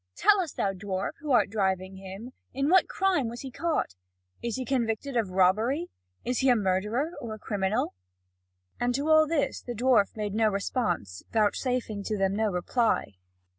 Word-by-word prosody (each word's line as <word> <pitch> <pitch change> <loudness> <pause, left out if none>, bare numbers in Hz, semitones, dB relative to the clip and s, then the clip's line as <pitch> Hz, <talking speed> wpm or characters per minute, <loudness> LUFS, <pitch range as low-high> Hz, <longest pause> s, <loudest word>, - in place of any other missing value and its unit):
Tell 410 -1 +4
us, 335 -5 -4
thou 195 - 0
dwarf, 190 0 -3
who 300 - -7
art 245 -6 +3
driving 190 -2 -1
him, 195 +6 -8 0.2
in 275 +2 +1
what 375 - +5
crime 375 -10 +1
was 235 +1 -7
he 265 - -7
caught? 330 - -1 0.5
Is 235 -2 -2
he 260 - -3
convicted 245 +1 -1
of 225 -5 +1
robbery? 215 - +2 0.3
Is 250 0 0
he 265 - +3
a 245 - +6
murderer, 210 - 0
or 225 -2 -5
a - - -11
criminal?" 205 +2 -1 0.9
And 245 0 +1
to 285 +3 -1
all 315 0 +6
this 310 -2 0
the 240 - -6
dwarf 235 -3 +3
made 210 -2 -2
no 220 0 +3
response, 185 - -2
vouchsafing 225 0 0
to 215 - -1
them 195 0 +1
no 220 +1 +1
reply. 205 - 0
225 Hz, 175 wpm, -28 LUFS, 195-260 Hz, 0.9 s, a